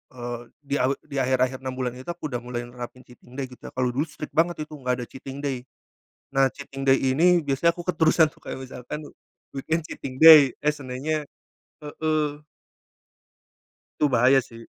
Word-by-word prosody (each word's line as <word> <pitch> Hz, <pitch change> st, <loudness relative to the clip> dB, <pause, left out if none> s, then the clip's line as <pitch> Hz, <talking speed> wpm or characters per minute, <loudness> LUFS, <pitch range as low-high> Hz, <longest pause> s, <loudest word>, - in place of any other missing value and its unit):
eee 120 Hz, -1 st, -5 dB, 0.2 s
di 140 Hz, 0 st, -2 dB
a 125 Hz, -, +3 dB, 0.2 s
di 145 Hz, -2 st, -10 dB
akhir-akhir 130 Hz, 0 st, +1 dB
6 130 Hz, -1 st, -5 dB
bulan 130 Hz, -1 st, -2 dB
itu 130 Hz, -, -12 dB
aku 155 Hz, -4 st, -6 dB
udah 120 Hz, -, -2 dB
mulai 120 Hz, 0 st, -5 dB
nerapin 120 Hz, +1 st, -9 dB
cheating 125 Hz, 0 st, -17 dB
day 140 Hz, -, -3 dB
gitu 125 Hz, -, -13 dB
ya, -, -, -9 dB
kalo 125 Hz, -1 st, +1 dB
dulu 140 Hz, +6 st, -1 dB
strict 150 Hz, -, -8 dB
banget 165 Hz, -1 st, +1 dB
itu 150 Hz, -, -15 dB
gak 125 Hz, -1 st, 0 dB
ada -, -, -6 dB
cheating 135 Hz, +1 st, -9 dB
day. 140 Hz, -3 st, -1 dB, 0.8 s
Nah, 135 Hz, -1 st, +4 dB
cheating 135 Hz, -1 st, -9 dB
day 135 Hz, 0 st, +5 dB
ini 165 Hz, +7 st, +4 dB
biasanya 140 Hz, +5 st, +3 dB
aku 175 Hz, -, -8 dB
keterusan 160 Hz, -2 st, +4 dB
tuh -, -, -25 dB
kayak -, -, -6 dB
misalkan 130 Hz, +3 st, -7 dB, 0.5 s
weekend 160 Hz, +4 st, -2 dB
cheating 130 Hz, -5 st, -7 dB
day, 155 Hz, -3 st, +10 dB
eee, 150 Hz, 0 st, +1 dB
Seninnya 145 Hz, +3 st, -3 dB, 0.6 s
heeh. 150 Hz, 0 st, -2 dB, 1.6 s
Itu 150 Hz, -, +4 dB
bahaya 130 Hz, +2 st, +5 dB
sih. 115 Hz, -2 st, -13 dB
135 Hz, 180 wpm, -25 LUFS, 125-150 Hz, 1.6 s, day